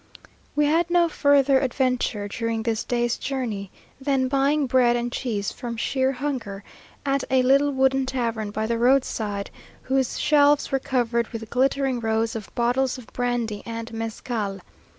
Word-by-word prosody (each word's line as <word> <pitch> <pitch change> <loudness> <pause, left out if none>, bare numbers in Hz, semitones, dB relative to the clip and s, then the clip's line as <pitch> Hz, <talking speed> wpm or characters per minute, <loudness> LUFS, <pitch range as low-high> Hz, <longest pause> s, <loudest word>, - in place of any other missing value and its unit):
We 295 - +3
had 330 +3 +2
no 345 -1 +4
further 285 -3 +4
adventure 250 -5 0
during 225 +1 -2
this 225 -1 -1
day's 240 -1 -1
journey, 230 -8 -3 0.3
than 265 -2 +1
buying 280 +2 +2
bread 245 -2 +3
and 240 0 -2
cheese 215 -6 -2
from 235 -3 -6
sheer 265 +3 +1
hunger, 250 -8 -4 0.4
at 275 -1 +1
a 260 -1 +3
little 275 +3 +4
wooden 265 -1 +2
tavern 230 -5 -2
by 215 +1 -2
the 230 +1 -1
road 260 +2 +4
side, 205 -2 -4 0.3
whose 265 -1 0
shelves 290 -1 +4
were 270 - +2
covered 235 -3 0
with 225 -1 -8
glittering 265 0 +1
rows 225 0 0
of 215 -3 -6
bottles 250 +2 +1
of 250 - -13
brandy 240 -4 -1
and 230 0 -6
mezcal. 225 -2 -4
250 Hz, 155 wpm, -24 LUFS, 225-270 Hz, 0.4 s, no